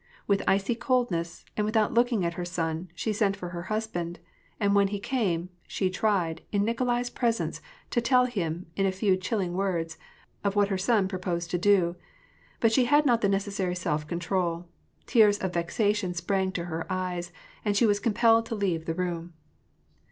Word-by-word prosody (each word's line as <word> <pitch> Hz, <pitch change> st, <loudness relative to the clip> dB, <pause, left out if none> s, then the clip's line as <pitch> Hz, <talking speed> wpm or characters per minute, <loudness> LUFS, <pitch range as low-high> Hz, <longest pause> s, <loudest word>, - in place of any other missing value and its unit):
With 200 Hz, -1 st, +2 dB
icy 195 Hz, +5 st, +2 dB
coldness, 230 Hz, -10 st, -1 dB
and 210 Hz, -, 0 dB
without 215 Hz, 0 st, +1 dB
looking 235 Hz, -5 st, +2 dB
at 170 Hz, -, -1 dB
her 175 Hz, -, -4 dB
son, 170 Hz, 0 st, -3 dB
she 220 Hz, -, -1 dB
sent 200 Hz, -1 st, +1 dB
for 180 Hz, -3 st, -6 dB
her 175 Hz, 0 st, -5 dB
husband; 195 Hz, -6 st, -2 dB, 0.4 s
and 200 Hz, -1 st, +2 dB
when 200 Hz, -1 st, +4 dB
he 200 Hz, +1 st, -3 dB
came, 195 Hz, -7 st, -1 dB, 0.2 s
she 185 Hz, -2 st, -1 dB
tried, 185 Hz, -5 st, 0 dB
in 205 Hz, -1 st, +2 dB
Nikolai's 245 Hz, +1 st, 0 dB
presence, 235 Hz, -2 st, -1 dB, 0.3 s
to 240 Hz, -, +2 dB
tell 250 Hz, +1 st, +4 dB
him, 180 Hz, -8 st, -3 dB
in 195 Hz, 0 st, +2 dB
a -, -, +1 dB
few 190 Hz, 0 st, +2 dB
chilling 185 Hz, -1 st, -2 dB
words, 170 Hz, -4 st, -2 dB, 0.4 s
of 200 Hz, 0 st, 0 dB
what 205 Hz, -1 st, +3 dB
her 195 Hz, -, 0 dB
son 205 Hz, -1 st, +2 dB
proposed 180 Hz, -2 st, -3 dB
to 175 Hz, -, 0 dB
do; 180 Hz, -3 st, +3 dB, 0.6 s
but 225 Hz, -, +4 dB
she 250 Hz, +2 st, +4 dB
had 295 Hz, +4 st, +4 dB
not 240 Hz, -4 st, +3 dB
the 200 Hz, -, +3 dB
necessary 195 Hz, -2 st, -1 dB
self 155 Hz, -4 st, -2 dB
control: 170 Hz, 0 st, -1 dB, 0.4 s
tears 215 Hz, -4 st, +5 dB
of 190 Hz, -3 st, -2 dB
vexa 190 Hz, +5 st, +1 dB
tion 185 Hz, -4 st, -3 dB
sprang 190 Hz, +2 st, 0 dB
to 170 Hz, -2 st, -3 dB
her 165 Hz, -1 st, -4 dB
eyes, 180 Hz, -1 st, -2 dB, 0.3 s
and 205 Hz, -1 st, +1 dB
she 235 Hz, -, +5 dB
was 205 Hz, -2 st, +3 dB
compelled 230 Hz, +1 st, +3 dB
to 225 Hz, -, -3 dB
leave 180 Hz, -6 st, -1 dB
the 165 Hz, -, -2 dB
room. 175 Hz, -1 st, -3 dB
195 Hz, 185 wpm, -27 LUFS, 175-220 Hz, 0.6 s, tears